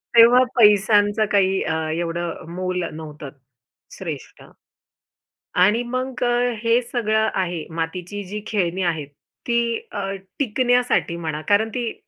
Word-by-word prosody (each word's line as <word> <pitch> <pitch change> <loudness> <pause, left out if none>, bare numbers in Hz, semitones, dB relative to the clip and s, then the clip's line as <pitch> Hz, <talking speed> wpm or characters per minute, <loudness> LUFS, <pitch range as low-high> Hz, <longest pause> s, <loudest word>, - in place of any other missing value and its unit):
तेव्हा 240 +2 +8
पैशांचं 210 -1 +4
काही 195 -1 +3
अ, 160 - -1 0.2
एवढं 170 0 -2
अ, - - -11
मोल 185 0 -2
नव्हतं 155 -2 -8 0.7
श्रेष्ठ. - - -7 1.2
आणि 210 +6 +4
मग 255 +1 -4
अ, 245 0 +2
हे 230 +1 +3
सगळं 220 -2 0
आहे 175 -4 -2
मातीची 180 +5 -4
जी 210 +3 -6
खेळणी 190 -3 -1
आहेत. 160 -5 -1 0.4
ती 235 -1 +2 0.3
अ, 195 -2 -3 0.3
टिकण्यासाठी 245 -7 +1
म्हणा 160 -2 -4
कारण 210 +2 +3
ती 240 -3 -2
205 Hz, 125 wpm, -22 LUFS, 175-235 Hz, 1.2 s, तेव्हा